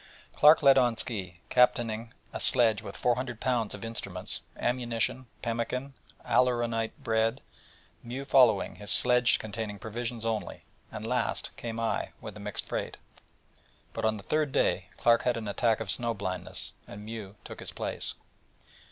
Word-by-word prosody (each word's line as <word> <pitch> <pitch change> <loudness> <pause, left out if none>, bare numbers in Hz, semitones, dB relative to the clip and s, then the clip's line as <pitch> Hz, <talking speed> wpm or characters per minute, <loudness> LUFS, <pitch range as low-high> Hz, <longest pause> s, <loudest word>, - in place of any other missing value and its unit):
Clark 150 +1 +7
led 135 -1 +8
on 120 -3 +2
ski, 100 -9 -1
captaining 115 -2 +2 0.2
a - - -3
sledge 115 -4 +4
with 100 -2 -8
400 120 -1 0
lbs. 120 -5 0
of 105 - -7
instruments, 100 -5 -4 0.2
ammunition, 120 0 -1 0.2
pemmican, 120 +4 -2 0.3
aleuronate 120 -3 +1
bread; 115 +2 +1 0.6
Mew 130 +4 -6
followed, 125 -8 +4
his 105 - -6
sledge 125 -1 +4
containing 110 -1 -5
provisions 115 +2 -4
only; 110 -2 -2 0.3
and 110 0 -6
last 125 +2 -1
came 115 -1 -5
I, 115 -1 -1
with - - -8
a - - -9
mixed - - -3
freight. - - -3 1.0
But - - -4
on 110 0 +2
the 100 - -10
third 150 -2 0
day - - +1
Clark 115 0 +4
had 125 -1 +1
an 110 -2 -4
attack 110 +2 +2
of - - -2
snow 115 -1 0
blindness, 95 -2 -4
and 105 +1 -9
Mew 110 -3 -7
took - - -9
his - - -6
place. - - -4
115 Hz, 150 wpm, -29 LUFS, 110-125 Hz, 1.0 s, led